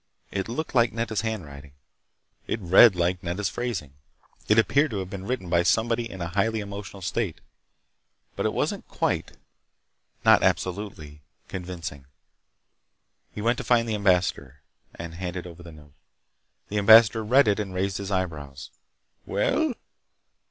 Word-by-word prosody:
It 95 Hz, +2 st, -3 dB
looked 155 Hz, +7 st, -4 dB
like 120 Hz, -2 st, +3 dB
Nedda's 115 Hz, -2 st, -2 dB
handwriting. 75 Hz, -11 st, -6 dB, 0.7 s
It -, -, -2 dB
read 95 Hz, +3 st, +7 dB
like 90 Hz, +1 st, 0 dB
Nedda's 90 Hz, +2 st, -2 dB
phrasing. 100 Hz, -, -4 dB, 0.5 s
It 105 Hz, -, +4 dB
appeared 140 Hz, +7 st, +3 dB
to 110 Hz, -, -4 dB
have 95 Hz, -1 st, -5 dB
been 95 Hz, -2 st, -6 dB
written 125 Hz, -7 st, -3 dB
by 85 Hz, 0 st, +3 dB
somebody 115 Hz, +5 st, +1 dB
in 95 Hz, -3 st, -8 dB
a 85 Hz, -, -3 dB
highly 110 Hz, +5 st, 0 dB
emotional 100 Hz, -2 st, -8 dB
state. 95 Hz, -2 st, -2 dB, 1.0 s
But -, -, 0 dB
it -, -, -1 dB
wasn't -, -, -2 dB
quite—not -, -, -2 dB
absolutely—convincing. 85 Hz, -3 st, -4 dB, 1.3 s
He 105 Hz, -, -7 dB
went 120 Hz, +2 st, +1 dB
to -, -, -4 dB
find 115 Hz, 0 st, +2 dB
the 110 Hz, -, -1 dB
ambassador. 95 Hz, -4 st, 0 dB, 0.3 s
He -, -, -6 dB
handed 90 Hz, +2 st, -6 dB
over 90 Hz, 0 st, -11 dB
the 85 Hz, -1 st, -11 dB
note. 75 Hz, -2 st, -16 dB, 0.8 s
The 105 Hz, -, -1 dB
ambassador 110 Hz, +2 st, +7 dB
read 130 Hz, +4 st, +4 dB
it 105 Hz, 0 st, +2 dB
and 100 Hz, -3 st, -3 dB
raised 95 Hz, +1 st, -2 dB
his 100 Hz, -1 st, -5 dB
eyebrows. 75 Hz, -8 st, -4 dB, 0.6 s
"Well?" -, -, 0 dB
95 Hz, 140 wpm, -25 LUFS, 85-110 Hz, 1.3 s, read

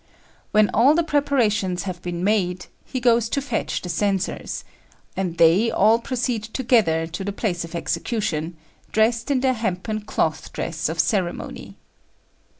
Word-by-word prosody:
When 215 Hz, -1 st, +3 dB
all 265 Hz, +8 st, +5 dB
the 340 Hz, -, +3 dB
preparations 230 Hz, -, +1 dB
have 185 Hz, -3 st, -5 dB
been 175 Hz, 0 st, -4 dB
made, 185 Hz, -3 st, +1 dB, 0.2 s
he 260 Hz, -, -4 dB
goes 235 Hz, -2 st, +3 dB
to 280 Hz, -, 0 dB
fetch 265 Hz, -5 st, -2 dB
the 180 Hz, -, -5 dB
censors; 195 Hz, +2 st, -1 dB, 0.5 s
and 180 Hz, -3 st, -2 dB
they 170 Hz, +8 st, +5 dB
all 220 Hz, +3 st, +4 dB
proceed 245 Hz, -2 st, -2 dB
together 220 Hz, -9 st, +2 dB
to 170 Hz, +4 st, -6 dB
the 200 Hz, -, -2 dB
place 195 Hz, -4 st, -2 dB
of 165 Hz, 0 st, -8 dB
execution, 170 Hz, -4 st, -2 dB, 0.3 s
dressed 225 Hz, +3 st, +2 dB
in 270 Hz, -3 st, +2 dB
their 260 Hz, -1 st, +3 dB
hempen 215 Hz, -1 st, -2 dB
cloth 160 Hz, -6 st, -2 dB
dress 160 Hz, 0 st, -2 dB
of 165 Hz, +1 st, -4 dB
ceremony. 175 Hz, +2 st, -2 dB
205 Hz, 150 wpm, -23 LUFS, 175-235 Hz, 0.5 s, all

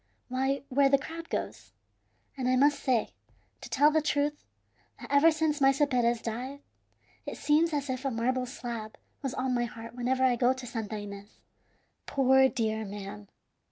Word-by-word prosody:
Why, 265 Hz, +2 st, 0 dB
where 275 Hz, +1 st, +4 dB
the 275 Hz, -, +5 dB
crowd 330 Hz, +4 st, -8 dB
goes. -, -, -5 dB, 0.6 s
And 260 Hz, -2 st, -2 dB
I 255 Hz, -, +3 dB
must 285 Hz, +3 st, +4 dB
say, 245 Hz, -4 st, +1 dB, 0.5 s
to -, -, -9 dB
tell 295 Hz, +1 st, +4 dB
the 315 Hz, 0 st, +2 dB
truth, 295 Hz, 0 st, -1 dB, 0.6 s
that -, -, -10 dB
ever 285 Hz, +3 st, +6 dB
since 310 Hz, -2 st, 0 dB
Maese 270 Hz, 0 st, +4 dB
Perez 240 Hz, -2 st, +1 dB
died, 255 Hz, +5 st, -5 dB, 0.7 s
it -, -, -5 dB
seems 305 Hz, +3 st, +3 dB
as 290 Hz, -2 st, -2 dB
if 260 Hz, 0 st, -3 dB
a 275 Hz, -, 0 dB
marble 250 Hz, +2 st, -1 dB
slab 235 Hz, -4 st, -6 dB, 0.2 s
was 270 Hz, -3 st, -3 dB
on 255 Hz, 0 st, -1 dB
my 240 Hz, -1 st, +1 dB
heart 230 Hz, 0 st, -9 dB
whenever 255 Hz, +2 st, 0 dB
I 250 Hz, -2 st, +3 dB
go 250 Hz, +1 st, +3 dB
to 260 Hz, -1 st, -9 dB
Santa 220 Hz, -3 st, -4 dB
Ines. 205 Hz, 0 st, -9 dB, 0.7 s
Poor 265 Hz, 0 st, +4 dB
dear 220 Hz, -4 st, -1 dB
man! 200 Hz, 0 st, -8 dB
260 Hz, 170 wpm, -29 LUFS, 235-280 Hz, 0.7 s, ever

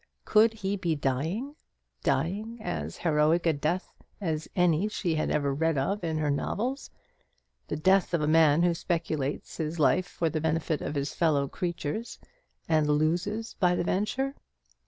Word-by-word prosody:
Could 220 Hz, +1 st, +5 dB
he 205 Hz, -2 st, -2 dB
be 170 Hz, -4 st, 0 dB
dying? 160 Hz, -, -2 dB, 0.5 s
dying 215 Hz, +7 st, -1 dB
as 80 Hz, -, -4 dB
heroic 160 Hz, +1 st, +2 dB
a 165 Hz, -, +4 dB
death 155 Hz, +6 st, -2 dB, 0.3 s
as 160 Hz, -5 st, -2 dB
any 180 Hz, +1 st, +3 dB
she 205 Hz, -5 st, -1 dB
had 155 Hz, -, 0 dB
ever 140 Hz, -2 st, +1 dB
read 160 Hz, +1 st, +1 dB
of 190 Hz, +9 st, -1 dB
in 160 Hz, -2 st, -1 dB
her 150 Hz, -2 st, +1 dB
novels: 245 Hz, -, -2 dB, 0.8 s
the -, -, -2 dB
death 190 Hz, +4 st, +3 dB
of -, -, +1 dB
a -, -, +1 dB
man 160 Hz, 0 st, +5 dB
who 175 Hz, -1 st, +3 dB
speculates 160 Hz, -5 st, -2 dB
his 160 Hz, +1 st, -3 dB
life 180 Hz, +5 st, +3 dB
for 170 Hz, -, -2 dB
the 155 Hz, -1 st, -1 dB
benefit 160 Hz, -1 st, 0 dB
of -, -, -4 dB
his 140 Hz, 0 st, -2 dB
fellow 150 Hz, -5 st, +2 dB
creatures, 175 Hz, -, -4 dB, 0.5 s
and 155 Hz, -2 st, +3 dB
loses 175 Hz, +9 st, 0 dB
by 180 Hz, -2 st, +3 dB
the -, -, 0 dB
venture. 230 Hz, +10 st, -1 dB
165 Hz, 160 wpm, -28 LUFS, 150-190 Hz, 0.8 s, Could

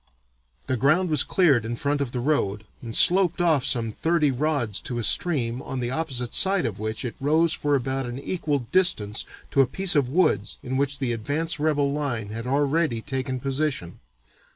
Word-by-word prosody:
The 130 Hz, -, -1 dB
ground 155 Hz, +8 st, +2 dB
was 150 Hz, -4 st, +4 dB
cleared 145 Hz, -, +2 dB
in 115 Hz, +2 st, -4 dB
front 145 Hz, +3 st, -1 dB
of 135 Hz, -4 st, -3 dB
the 125 Hz, -, -3 dB
road 110 Hz, -7 st, -1 dB, 0.2 s
and 115 Hz, -2 st, -7 dB
sloped 180 Hz, -1 st, +5 dB
off 160 Hz, -6 st, +2 dB
some 120 Hz, -5 st, 0 dB
thirty 160 Hz, +3 st, +1 dB
rods 130 Hz, -6 st, -1 dB
to 120 Hz, -, -4 dB
a 120 Hz, -, -2 dB
stream, 125 Hz, -5 st, +2 dB
on 135 Hz, -1 st, -5 dB
the 120 Hz, 0 st, -3 dB
opposite 130 Hz, -5 st, -3 dB
side 195 Hz, -1 st, +2 dB
of 100 Hz, -3 st, -4 dB
which 110 Hz, +3 st, -3 dB
it 120 Hz, -, -4 dB
rose 155 Hz, +4 st, +2 dB
for 145 Hz, -1 st, 0 dB
about 135 Hz, 0 st, -2 dB
an 120 Hz, +1 st, -6 dB
equal 145 Hz, -3 st, -2 dB
distance 110 Hz, -, +2 dB, 0.3 s
to 140 Hz, -, +4 dB
a 135 Hz, -, +2 dB
piece 190 Hz, +5 st, +1 dB
of 140 Hz, -4 st, +2 dB
woods 130 Hz, -, +1 dB
in 130 Hz, 0 st, -4 dB
which 140 Hz, +1 st, +1 dB
the 130 Hz, -4 st, -2 dB
advance 145 Hz, +8 st, -2 dB
rebel 145 Hz, -2 st, +1 dB
line 125 Hz, -8 st, -3 dB
had 115 Hz, +3 st, -6 dB
already 140 Hz, -1 st, 0 dB
taken 130 Hz, -2 st, -3 dB
position. 135 Hz, -, -3 dB
135 Hz, 190 wpm, -24 LUFS, 120-155 Hz, 0.3 s, sloped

